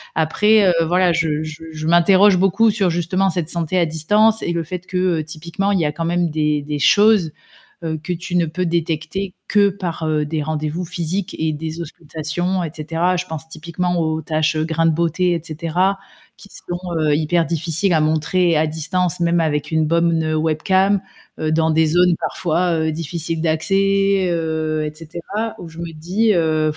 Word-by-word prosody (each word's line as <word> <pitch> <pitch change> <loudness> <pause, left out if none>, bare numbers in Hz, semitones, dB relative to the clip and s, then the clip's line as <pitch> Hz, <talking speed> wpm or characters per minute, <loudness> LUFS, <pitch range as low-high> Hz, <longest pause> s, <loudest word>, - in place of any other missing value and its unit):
Après 200 +5 +3 0.2
voilà, 180 +1 +3
je 155 -2 0
je 155 +1 -8
je 155 0 -6
m'interroge 185 +3 +5
beaucoup 195 +4 +3
sur 200 -3 +1
justement 175 +3 0
cette 170 -3 -2
santé 170 +1 -1
à 175 - +3
distance 210 +8 +2
et - - -2
le 170 -1 -1
fait 180 +3 -5
que 180 -3 0
typiquement 170 +6 -3
il 195 - +2
y 165 - +1
a 150 - 0
quand 165 +2 -4
même 175 0 0
des 150 -1 0
des 150 0 -4
choses 205 +1 +4 0.5
que 160 +1 -3
tu 175 +1 -4
ne 170 -1 +2
peux 180 +4 -3
détecter 170 +3 -2
que 205 -1 +4
par 180 -4 -4 0.2
des 155 0 -2
rendez-vous 155 +3 -3
physiques 180 +2 -3
et 160 -1 0
des 160 +2 -5
auscultations 170 +3 -3
et 160 - -4
cetera. 165 +4 -1
Je 180 +1 -3
pense 160 -2 -7
typiquement 170 +3 -3
aux 160 -1 -1
tâches 155 -1 0
grains 160 +1 0
de 165 - +4
beauté 170 +2 +1
et 170 - -2
cetera, 170 +5 -1 0.4
qui - - -14
sont, 175 -2 -7 0.2
heu, 155 -2 +2
hyper 160 +3 +1
difficiles 165 +3 -1
à 160 - +3
montrer 160 +3 +1
à 155 +1 +2
distance 165 +3 -1
même 170 0 +2
avec 150 -2 -1
une 160 -1 +2
bonne 170 +1 +2
me 155 -1 -1
webcam 185 +6 +1 0.4
dans 160 +1 +1
des 160 +1 +3
zones 175 +2 +3
parfois, 175 +1 -1
heu, 160 0 0
difficiles 165 +1 -4
d'accès, 195 +3 +1
heu 160 -2 -1
et 150 - -6
cetera, 170 +8 -5
où 170 - -9
je 160 0 -14
me 170 -1 -5
dis, 185 +8 0
heu, 155 -2 +1
165 Hz, 180 wpm, -19 LUFS, 155-180 Hz, 0.5 s, m'interroge